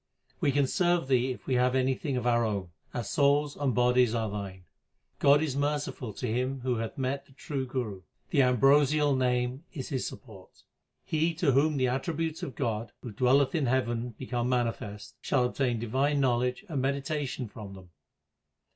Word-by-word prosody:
We 140 - +2
can 140 0 +3
serve 175 +1 +1
Thee 130 -1 +2
if 125 - -6
we 130 - -1
have 125 +1 +2
anything 130 +1 0
of 125 - -3
our 120 -1 +3
own; 100 -5 -2 0.2
our 120 - -3
souls 145 +4 +2
and 135 -5 -1
bodies 125 -1 +3
are 110 -3 -1
Thine. 100 -3 -6 0.6
God 145 +2 +5
is 145 -4 -2
merciful 145 -4 -2
to 125 - -5
him 125 +3 -1
who 125 -1 0
hath 115 0 -4
met 135 +1 -2
the 135 - -20
true 135 -1 -4
Guru; 120 -7 -4 0.3
the 145 - +4
ambrosial 140 +3 +4
Name 125 +2 0
is 135 -7 -5
his 130 -3 -2
support. 105 -8 -12 0.4
He 160 +1 0
to 160 -4 +2
whom 145 +3 +3
the 130 -1 +2
attributes 160 +5 -2
of 130 - -5
God, 115 -4 -2
who 120 - -6
dwelleth 130 +5 +3
in 155 -6 +1
heaven, 120 -2 -1
become 125 -1 -2
manifest, 115 -4 -2
shall 125 - +1
obtain 125 -1 0
divine 135 +6 0
knowledge 125 - +1
and 145 -7 -2
medita 140 +2 -1
tion 130 -1 -5
from 100 -2 -9
them. 90 -2 -14
130 Hz, 180 wpm, -29 LUFS, 120-140 Hz, 0.6 s, God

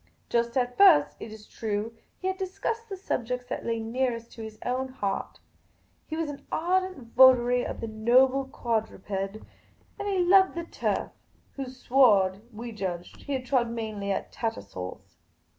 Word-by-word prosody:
Just 235 +1 +1
at 245 -1 -1
first, 340 -8 +7
it 220 - -8
is 215 -1 -11
true, 220 +1 -3 0.2
he - - -10
had 380 - 0
discussed 440 +4 -3
the 390 - -5
subjects 250 - -2
that - - -3
la} 230 - +1
nearest 230 +1 -2
to 230 - -10
his 220 -1 -8
own 255 +1 -1
heart. 205 -7 -3 0.7
He 315 - -4
was 325 -1 -1
an 285 -1 -8
ardent 360 -7 -1
votary 250 -1 +6
of - - -5
the 230 - -3
noble 255 +5 +3
quad 235 -5 -1
ruped; 195 - -16
and 195 - -7
he 395 -1 0
loved 380 +1 +5
the 340 - -3
turf - - -2 0.2
— - - -36
whose 260 -2 -6
sward, 205 -8 +4
we 230 +2 -7
judged, 185 -5 -5
he 275 -2 -2
trod 250 -2 +1
mainly 215 -3 -3
at - - -3
Tattersall's. 100 - -6
245 Hz, 165 wpm, -27 LUFS, 220-275 Hz, 0.7 s, first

